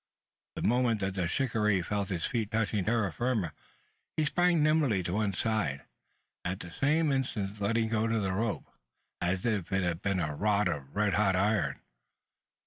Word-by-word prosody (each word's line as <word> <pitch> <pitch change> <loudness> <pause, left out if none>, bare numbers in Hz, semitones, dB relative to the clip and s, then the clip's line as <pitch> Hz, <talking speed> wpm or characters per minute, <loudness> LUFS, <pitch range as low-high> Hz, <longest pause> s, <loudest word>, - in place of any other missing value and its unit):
The - - -4
moment 120 -1 +2
that 95 0 -1
the 95 -3 -1
shikaree 105 -5 +1
felt 100 +2 -2
his 85 -4 -2
feet 115 -4 -1
touching 110 -2 0
terra 110 -6 +1
firma, 115 -10 -1 0.6
he 155 - +2
sprang 175 -1 +3
nimbly 150 - +3
to 85 - -3
one 105 0 +1
side, 95 - -1 0.6
at 90 +1 -3
the 85 - -8
same 150 - +2
instant 105 -7 -2
letting 110 +2 +1
go 110 0 +1
the 110 -4 0
rope, 110 +2 -1 0.6
as 90 +1 0
if 105 -7 -1
it 95 0 +1
had 85 0 -1
been 100 -2 0
a 75 -3 -1
rod 105 +5 +2
of 70 -2 -4
red 105 -1 +2
hot 100 -3 +3
iron! 95 -7 +1
105 Hz, 170 wpm, -30 LUFS, 95-115 Hz, 0.6 s, sprang